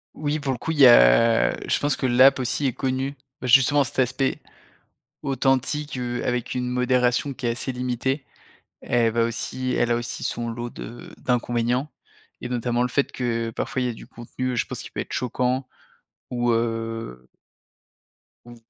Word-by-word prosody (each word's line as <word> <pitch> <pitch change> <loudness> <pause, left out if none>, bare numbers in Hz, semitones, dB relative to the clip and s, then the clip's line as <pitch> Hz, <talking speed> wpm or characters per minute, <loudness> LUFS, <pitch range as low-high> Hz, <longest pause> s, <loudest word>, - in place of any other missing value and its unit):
Oui 150 0 -2
pour 140 -2 -2
le 125 - -3
coup, 160 - -3
il 160 - -3
y 135 - +9
a - - +6
je - - +1
pense 145 -1 +1
que - - -3
l'app 130 +2 +5
aussi 130 +3 0
est 130 - -1
connue. 135 +2 -2 0.3
Bah, 125 - -3
justement 135 +3 +5
cet 125 - -8
aspect 130 +1 +1 0.8
authentique, 140 +1 0
heu, 120 -1 -3
avec 125 -1 -1
une 125 -1 -2
modération 125 +2 +1
qui 130 - -7
est - - +2
assez 130 +3 -3
limitée, 125 +2 -2 0.6
elle 115 -2 +1
va 115 0 +2
aussi 130 +2 -3
elle 120 - +1
a 120 - +3
aussi 120 0 -5
son 120 0 -2
lot 120 +1 -5
de 120 +1 -9
d'inconvénients, 120 +2 0 0.5
et 125 - -5
notamment 120 0 0
le 125 - +1
fait 140 +3 0
que, 115 -2 -2
parfois, 130 +3 -3
il 125 - 0
y - - 0
a - - -4
du - - -12
contenu, 125 +2 -5
heu, - - -3
je - - 0
pense - - -6
qui - - -10
peut - - -4
être - - -7
choquant 125 +1 -1 0.6
ou, 120 -1 0
heu 115 - -3 1.2
ou, 120 0 -12
125 Hz, 185 wpm, -24 LUFS, 120-130 Hz, 1.2 s, y